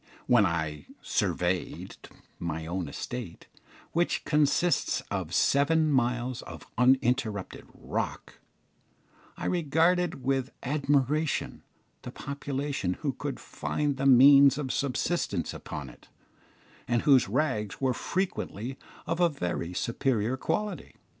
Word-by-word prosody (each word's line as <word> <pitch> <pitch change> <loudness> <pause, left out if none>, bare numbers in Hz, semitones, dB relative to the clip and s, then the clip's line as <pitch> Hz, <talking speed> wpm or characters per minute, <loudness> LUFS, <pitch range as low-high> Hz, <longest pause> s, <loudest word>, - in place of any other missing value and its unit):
When 115 -5 +5
I 80 -3 -3 0.2
"surveyed" 90 +1 -1 0.4
my 80 -2 -3
own 85 -1 -3
estate, 120 -3 -6 0.5
which 170 +1 0
consists 150 +3 +2
of 95 -5 -3
seven 150 - +3
miles 125 -1 0
of - - -10
uninterrupted 125 -5 +1
rock, - - -5 1.0
I - - -5
regarded 170 -1 +1
with 135 0 0
admiration 145 +2 0 0.4
the - - -7
population 140 -8 -3
who 140 -3 -1
could 140 0 -5
find 145 -2 -2
the 135 +1 +1
means 140 +1 +8
of 135 -4 -2
subsistence 135 - -1
upon - - -7
it, - - -15 0.8
and 120 -1 +1
whose 135 -8 +5
rags 110 -5 -1
were 130 -2 +1
frequently 135 - -3 0.3
of 165 +1 -2
a 175 -1 +5
very 90 - -3
superior 115 +3 0
quality. 205 +7 -3
130 Hz, 110 wpm, -28 LUFS, 110-145 Hz, 1.0 s, means